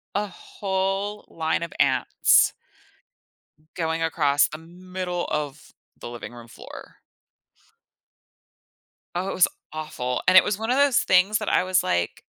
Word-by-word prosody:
a 205 +1 0
whole 195 +2 -3
line 160 0 -1
of 170 - -6
ants - - +3 1.2
going 165 -1 -2
across 145 -3 +2
the 155 - -8
middle 180 +2 -5
of 150 -1 -4 0.3
the 120 - -7
living 120 0 -8
room 120 -1 -12
floor. 115 - -12 2.2
Oh, 185 +2 -2
it - - -3
was 180 - +5 0.2
awful, 150 -5 -4
and 185 - +5
it - - +9
was 205 0 -2
one 225 +1 -3
of - - +3
those 280 -2 +4
things 190 +3 +3
that 215 - -5
I - - +3
was 185 0 +2
like, 85 -1 -2
180 Hz, 140 wpm, -24 LUFS, 150-195 Hz, 2.2 s, it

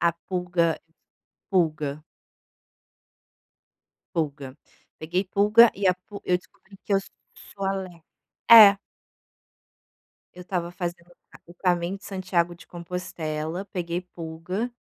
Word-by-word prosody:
a 170 - +4
pulga 175 -1 -1 0.7
pulga, 155 -5 0 2.1
Pulga, 145 -4 -2 0.5
peguei 175 +5 -1
pulga 210 +3 +7
e 200 - -10
a 180 - +4
pul 205 -1 -9
eu 180 - +5
descobri 190 +2 -18
que 205 - -3
eu 195 - +3 0.5
sou 195 - -6
alergica 190 -4 -4 0.5
é. 210 -4 +10 1.6
Eu 180 - -10
estava 175 -2 -3
fazendo 175 -1 -6 0.4
o 175 - -14
caminho 175 0 0
de - - -19
Santiago 185 -3 -1
de 170 - -16
Compostela, 170 -1 -5
peguei 175 -2 -3
pulga, 180 +6 -5
180 Hz, 110 wpm, -25 LUFS, 170-190 Hz, 2.1 s, é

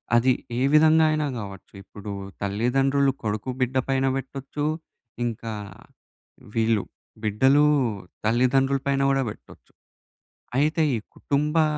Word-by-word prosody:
అది 120 +2 +4 0.3
ఏ - - 0
విధంగా 160 +1 +6
అయినా 155 -1 0
గావచ్చు. 100 -3 -8
ఇప్పుడూ 100 +1 -9 0.3
తల్లిదండ్రులు 135 +7 +2
కొడుకు, 110 +3 -2
బిడ్డ 130 +1 0
పైన 135 0 +2
బెట్టొచ్చు. 135 +2 -4 0.6
ఇంకా 115 -1 -4 1.0
వీళ్ళు 110 -2 +2 0.4
బిడ్డలూ 130 +7 +4 0.6
తల్లిదండ్రుల 130 +4 +3
పైన 140 0 +2
గూడా 135 -1 +2
బెట్టొచ్చు. - - -13 0.9
అయితే, 155 +3 +2 0.2
ఈ - - -1 0.2
కుటుంబా 150 +3 +1
135 Hz, 105 wpm, -25 LUFS, 115-140 Hz, 1.0 s, విధంగా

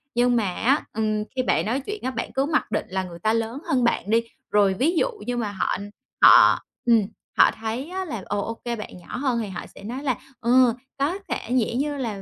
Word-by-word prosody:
Nhưng 245 0 +3
mà 205 -6 0
á, 270 +10 +2
ừm, 215 -1 0
khi 260 - +1
bạn - - +1
nói 235 +5 0
chuyện 415 +10 -6
á 260 - -1
bạn - - -4
cứ 270 - +1
mặc 310 +1 0
định - - -1
là 190 +1 -1
người 175 -2 -9
ta 215 +5 +1
lớn 230 +4 -2
hơn 255 -2 +2
bạn 235 -3 +1
đi, 230 +1 +3 0.3
rồi 200 -2 +4
ví 280 - +1
dụ - - +2
như 245 0 -2
mà 220 -4 -2
họ 195 - -1 0.4
họ - - +8 0.3
ừm, 230 -2 +5 0.4
họ - - +7
thấy 225 +7 -5
á 375 +1 -3
là, 230 - -5
ồ, 205 - -1
ô 225 - -3
kê 240 -1 -1
bạn 210 -4 -8
nhỏ 175 - -8
hơn 255 -3 0
thì 220 - -3
họ 190 - -5
sẽ - - -12
nói 250 +6 -5
là 255 -6 0 0.2
"Ừ, 245 0 +5 0.3
có 300 +7 +1
thể - - 0
vẻ 245 -3 +1
như 290 +3 -1
là 225 -7 -4
235 Hz, 240 wpm, -24 LUFS, 215-265 Hz, 0.4 s, họ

